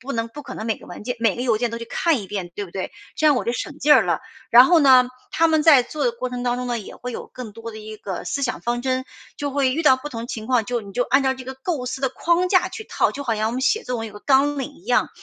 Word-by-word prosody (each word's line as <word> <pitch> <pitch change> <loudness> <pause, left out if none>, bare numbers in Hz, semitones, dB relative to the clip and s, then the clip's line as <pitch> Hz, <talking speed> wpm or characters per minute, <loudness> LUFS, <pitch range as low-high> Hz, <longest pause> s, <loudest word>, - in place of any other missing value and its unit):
不 275 +2 -6
能 230 0 -2
不 295 +5 -10
可 - - -8
能 220 - -6
每 220 - 0
个 - - -15
文 175 - -9
件 245 +2 -3
每 225 -4 +2
个 240 - -6
邮 235 -4 +2
件 240 +1 -1
都 230 - -5
去 230 - -6
看 320 -1 +1
一 195 - -8
遍， 185 -3 -5
对 205 -1 -4
不 - - -15
对？ 190 0 -5 0.2
这 310 - +2
样 295 - +6
我 - - -1
就 235 - 0
省 290 +4 -5
劲 295 +1 +5
儿 - - +6
了。 - - 0 0.3
然 245 +2 +9
后 340 0 +5
呢， 255 -3 +6 0.2
他 330 0 +3
们 315 -1 +3
在 295 -6 +7
做 300 - -4
的 485 - +2
过 255 - -4
程 245 0 -5
当 245 0 0
中 250 - -3
呢， 240 -1 -1
也 205 - -9
会 250 0 -6
有 - - -6
更 245 -5 -8
多 230 +1 -8
的 220 - -9
一 215 0 -9
个 190 -4 -6
思 280 +9 -2
想 250 - -1
方 240 0 -2
针。 260 0 0 0.4
就 285 -1 -2
会 270 -2 +1
遇 325 - -1
到 265 -4 +6
不 295 +3 -8
同 230 0 -5
情 220 -2 -6
况， 245 -4 +1
就 245 -2 -2
你 200 -1 -11
就 245 +3 0
按 270 +2 +3
照 265 - +2
这 260 -1 -9
个 265 +1 -6
构 265 -1 -3
思 265 +2 -5
的 265 - +1
框 345 +5 +1
架 370 -1 +4
去 430 +4 -8
套， - - +1
就 285 0 -6
好 230 -3 0
像 215 +1 0
我 - - -4
们 260 +1 -3
写 435 +10 +2
作 250 -1 -3
文 225 0 -4
有 - - -8
一 - - -16
个 205 - -11
纲 285 +1 +3
领 285 +2 -5
一 360 - -20
样。 - - +2
250 Hz, 360 characters per minute, -22 LUFS, 230-285 Hz, 0.4 s, 然